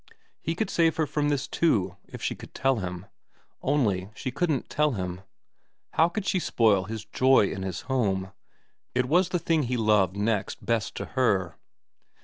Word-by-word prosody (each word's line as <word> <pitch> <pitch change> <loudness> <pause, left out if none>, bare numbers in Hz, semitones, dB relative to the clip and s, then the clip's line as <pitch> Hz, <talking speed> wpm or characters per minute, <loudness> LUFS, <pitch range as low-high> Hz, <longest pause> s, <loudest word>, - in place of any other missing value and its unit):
He 165 - -2
could 220 - -2
save 165 -1 +3
her 160 - +2
from 145 0 0
this 145 -2 -1
too 100 - +1
if - - -9
she - - 0
could - - -13
tell 135 -1 +2
him; 90 -2 -5 0.6
only 105 -10 +1
she 130 - -4
couldn't 145 -1 0
tell 150 -1 +1
him. 90 -3 -4 0.7
How 165 +2 +4
could 205 +2 -4
she 190 - +1
spoil 110 - +2
his 110 +1 -6
joy 130 -2 +4
in 95 - -5
his 95 -2 -4
home? 100 -8 -1 0.6
It 125 0 +2
was 175 +7 +3
the 180 - +1
thing 165 -2 +1
he 125 -2 -1
loved 105 -4 +3
next 105 -1 -1
best 115 -2 0
to - - -4
her. 100 -9 +1
120 Hz, 175 wpm, -27 LUFS, 95-150 Hz, 0.7 s, How